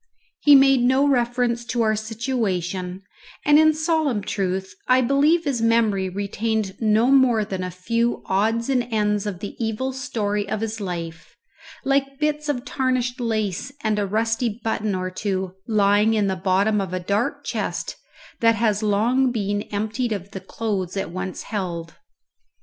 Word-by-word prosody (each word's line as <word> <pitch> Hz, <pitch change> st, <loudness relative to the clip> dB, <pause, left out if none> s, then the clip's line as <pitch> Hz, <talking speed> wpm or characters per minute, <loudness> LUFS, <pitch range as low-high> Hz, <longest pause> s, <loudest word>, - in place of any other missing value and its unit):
He 290 Hz, -1 st, +7 dB
made 270 Hz, -1 st, +6 dB
no 260 Hz, +3 st, +3 dB
reference 240 Hz, -2 st, +1 dB
to 240 Hz, -1 st, 0 dB
our 215 Hz, -1 st, +2 dB
situation, 200 Hz, -5 st, -3 dB, 0.4 s
and 295 Hz, +1 st, +6 dB
in 315 Hz, 0 st, +6 dB
solemn 310 Hz, -, 0 dB
truth 190 Hz, -1 st, -2 dB
I 255 Hz, 0 st, +5 dB
believe 285 Hz, +7 st, +3 dB
his 275 Hz, -6 st, -1 dB
memory 220 Hz, -4 st, +2 dB
retained 205 Hz, +1 st, -2 dB
no 220 Hz, +3 st, +3 dB
more 250 Hz, -6 st, +4 dB
than 190 Hz, -3 st, -4 dB
a 180 Hz, -, -3 dB
few 230 Hz, +7 st, -1 dB
odds 220 Hz, +4 st, +1 dB
and 250 Hz, -3 st, +1 dB
ends 210 Hz, -1 st, 0 dB
of 190 Hz, -3 st, -5 dB
the 205 Hz, -, -6 dB
evil 225 Hz, +4 st, -2 dB
story 210 Hz, -6 st, -2 dB
of 215 Hz, 0 st, -2 dB
his 225 Hz, 0 st, -3 dB
life, 165 Hz, -3 st, -6 dB, 0.5 s
like 275 Hz, 0 st, +1 dB
bits 300 Hz, 0 st, -1 dB
of 260 Hz, -3 st, -2 dB
tarnished 255 Hz, -2 st, -1 dB
lace 220 Hz, 0 st, -2 dB
and 215 Hz, -1 st, +1 dB
a 200 Hz, -, 0 dB
rusty 225 Hz, +2 st, -1 dB
button 215 Hz, -2 st, -1 dB
or 185 Hz, 0 st, -3 dB
two 190 Hz, -1 st, -3 dB
lying 210 Hz, 0 st, +3 dB
in 210 Hz, -2 st, +2 dB
the 190 Hz, -1 st, 0 dB
bottom 195 Hz, +3 st, +1 dB
of 190 Hz, -2 st, -5 dB
a -, -, -1 dB
dark 200 Hz, +5 st, -1 dB
chest -, -, -3 dB, 0.4 s
that 230 Hz, 0 st, +4 dB
has 215 Hz, -1 st, +1 dB
long 235 Hz, +5 st, +2 dB
been 205 Hz, -3 st, -1 dB
emptied 220 Hz, +4 st, -2 dB
of 200 Hz, -1 st, -6 dB
the 195 Hz, -, -6 dB
clothes 195 Hz, -2 st, -3 dB
it 195 Hz, -, -3 dB
once 185 Hz, +1 st, -5 dB
held. 170 Hz, -5 st, -4 dB
220 Hz, 160 wpm, -23 LUFS, 195-245 Hz, 0.5 s, He